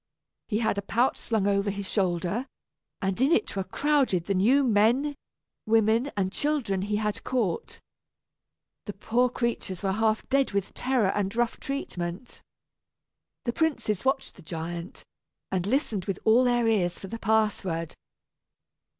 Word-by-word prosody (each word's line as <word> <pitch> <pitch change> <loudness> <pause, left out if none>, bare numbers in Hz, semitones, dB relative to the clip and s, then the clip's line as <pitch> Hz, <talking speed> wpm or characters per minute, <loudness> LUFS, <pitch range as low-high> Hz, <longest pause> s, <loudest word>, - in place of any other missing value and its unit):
He 210 - 0
had 220 -3 +1
a - - -2
pouch 235 +6 +1
slung 220 -4 -1
over 200 0 +2
his 200 -1 -4
shoulder, 185 - 0 0.6
and 195 +4 -1
in 275 +4 +4
it 355 - +1
were 195 - -1
crowded 270 - +1
the 200 - 0
new 240 +10 +4
men, 240 +5 +3 0.5
women, 225 +4 +3
and 190 -1 0
children 270 -11 0
he 205 +2 -1
had 210 0 -2
caught. 225 -10 -2 1.1
The 205 - -4
poor 240 +5 +1
creatures 235 -6 -3
were 195 - +1
half 220 +2 +1
dead 275 -4 +2
with 200 -1 -1
terror 250 -6 +1
and 200 +1 -1
rough 240 0 0
treatment. 185 -6 -5 1.0
The 235 - 0
princes 275 - 0
watched 265 0 0
the - - -13
giant, 170 +1 -6 0.5
and 185 0 -1
listened 220 - 0
with 195 -3 -2
all 235 +4 +5
their 240 -1 +2
ears 180 -6 +1
for - - -9
the 230 +4 -6
password. 200 -7 0
215 Hz, 150 wpm, -27 LUFS, 190-245 Hz, 1.1 s, all